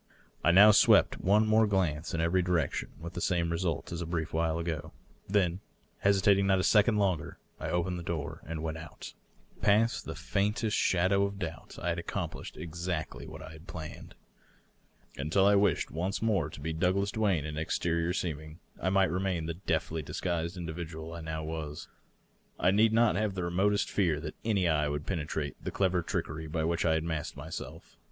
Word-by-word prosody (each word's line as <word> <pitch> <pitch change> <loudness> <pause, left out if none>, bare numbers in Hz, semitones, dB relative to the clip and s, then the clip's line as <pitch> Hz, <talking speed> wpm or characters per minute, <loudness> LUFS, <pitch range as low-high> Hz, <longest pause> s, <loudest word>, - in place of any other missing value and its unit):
I - - +4
now 100 +5 +9
swept 105 - +5
one 105 +3 +4
more 110 0 +4
glance 90 -5 0
in 80 - 0
every 85 +3 +2
direction, 90 -2 0
and - - -16
with 85 +1 -6
the 90 - -4
same 85 -2 +1
result 85 -3 -2
as 85 0 -4
a 85 - -4
brief 80 -2 -3
while 80 0 +1
ago. 85 -2 -4 0.4
Then, 95 -3 +2 0.4
hesi 100 -1 +3
tating 100 -2 +5
not 95 -1 +4
a 95 - +1
second 105 +2 +4
longer, 95 -6 0 0.2
I - - -3
opened 90 +1 -1
the - - -7
door 80 -4 -4
and 80 0 -4
went 80 0 -3
out. 80 +1 -10 0.5
Past 110 +3 +3
the - - -5
faintest 105 +2 0
slmdow 95 +2 +3
of 100 0 -8
doubt 85 -4 -6
I 90 - -2
had 85 0 -1
accomplished 85 - -5
exactly 85 -1 -4
what - - -9
I - - -9
had 80 +3 -13
planned. 80 -4 -8 1.0
Until 80 +8 +2
I 100 - +6
wished 100 -4 +2
once 90 +5 -2
more 110 -6 +1
to - - -10
be 80 +3 -3
Douglas 95 +4 +1
Duane 100 -9 +1
in 75 -1 -5
ex 80 +1 -1
terior 85 +1 0
seeming, 80 -2 -4 0.2
I 95 - +1
might 95 0 +3
remain 90 -2 -1
the 85 - -2
deftly 80 -2 -2
disguised 85 +3 -3
individual 80 -1 -6
I 85 - -6
now 80 0 -4
was. 80 -2 -5 0.7
I 90 - +4
need 110 +3 +4
not 115 0 +4
have 105 -2 0
the 90 - -2
remotest 95 +4 +1
fear 85 -7 +1
that - - -5
any 100 -5 +2
eye 75 -2 +2
would 75 0 -3
penetrate 80 -4 -3
the - - -2
clever 95 -2 +1
trickery 80 -1 -3
by 80 +1 -2
which 85 +1 0
I 80 -1 +3
had 80 - 0
masked 80 -2 -3
myself. 80 +3 -8
85 Hz, 195 wpm, -30 LUFS, 80-95 Hz, 1.0 s, now